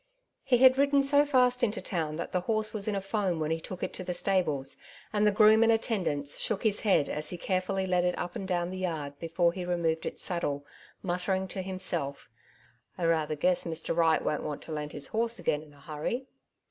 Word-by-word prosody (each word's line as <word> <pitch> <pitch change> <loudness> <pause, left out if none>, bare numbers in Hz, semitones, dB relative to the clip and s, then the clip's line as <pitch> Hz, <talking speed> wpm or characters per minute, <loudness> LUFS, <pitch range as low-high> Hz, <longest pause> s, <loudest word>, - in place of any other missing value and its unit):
He 265 -3 +3
had 260 +1 +6
ridden 280 0 +4
so 285 +1 +4
fast 250 -2 +3
into 225 -2 +1
town 160 -5 -2
that 170 - -5
the 180 - +1
horse 215 +3 -1
was 210 -2 0
in 210 - 0
a 195 - -1
foam 195 -4 -1
when 155 0 -1
he 165 - 0
took 180 +2 -7
it - - -3
to 185 - -5
the 180 -1 -3
stables, 155 -10 0 0.4
and 210 0 +3
the - - +5
groom 215 +2 +6
in 230 - +4
attendance 185 - 0
shook 215 -3 0
his 210 -2 +2
head 190 -9 +3
as 150 0 -1
he 180 - -3
care 185 +1 0
fully 190 +1 -2
led 180 -1 +2
it 180 0 0
up 175 0 -4
and 190 - -4
down 175 -1 -1
the 185 - -5
yard 150 -6 -3
before 170 +1 +1
he 185 -1 -5
re 175 0 -1
moved 165 -1 -1
its - - -5
saddle, 145 -5 -2 0.4
muttering 190 +1 -1
to 190 - -4
himself, 180 -7 -3 0.3
— - - -26
'• - - -2
I - - +3
rather 160 -2 +1
guess 180 +4 +2
Mr. 165 -1 -2
Wright 165 -1 +3
won^t 150 - -1
want 150 - -5
to - - -9
lend 150 -1 -4
his 145 - -4
horse 230 +1 -1
again 150 - 0
in 155 -1 -15
a - - -19
hurry." 155 - -3
180 Hz, 235 wpm, -29 LUFS, 160-210 Hz, 0.4 s, had